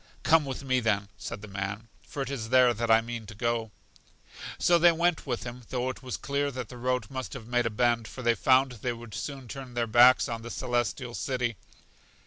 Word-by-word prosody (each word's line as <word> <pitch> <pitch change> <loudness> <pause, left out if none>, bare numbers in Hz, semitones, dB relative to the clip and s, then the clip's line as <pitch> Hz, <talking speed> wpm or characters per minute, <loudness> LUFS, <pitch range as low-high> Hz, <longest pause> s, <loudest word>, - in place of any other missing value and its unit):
Come 160 -2 +4
with 135 0 -5
me, 130 -1 +2
then, 105 -4 0
said 100 - -7
the - - -7
man, 100 +2 -5 0.2
for 140 - -3
it 135 - -6
is 115 -5 -4
there 125 -1 +5
that 115 +1 -3
I 110 0 +6
mean 115 -1 -6
to 105 - -10
go. 115 0 -1 0.9
So 175 -1 +4
they 175 +1 +7
went 170 -1 0
with 120 -3 -2
him, 120 +1 -7
though 125 0 -1
it - - -12
was 125 -2 -4
clear 140 +1 -1
that 125 -4 -6
the 125 - -9
road 125 -2 -1
must 130 -1 -5
have 125 -5 -8
made 120 0 +1
a - - 0
bend, 115 0 +1
for 130 - -9
they 120 0 +4
found 130 +2 +3
they 120 +1 -3
would 115 -2 -11
soon 135 -3 -5
turn 130 -1 -8
their 120 -1 +1
backs 120 +3 +6
on 115 -1 -4
The 120 - -8
Celestial 120 -1 -2
City. 125 -2 -2
120 Hz, 225 wpm, -28 LUFS, 115-130 Hz, 0.9 s, they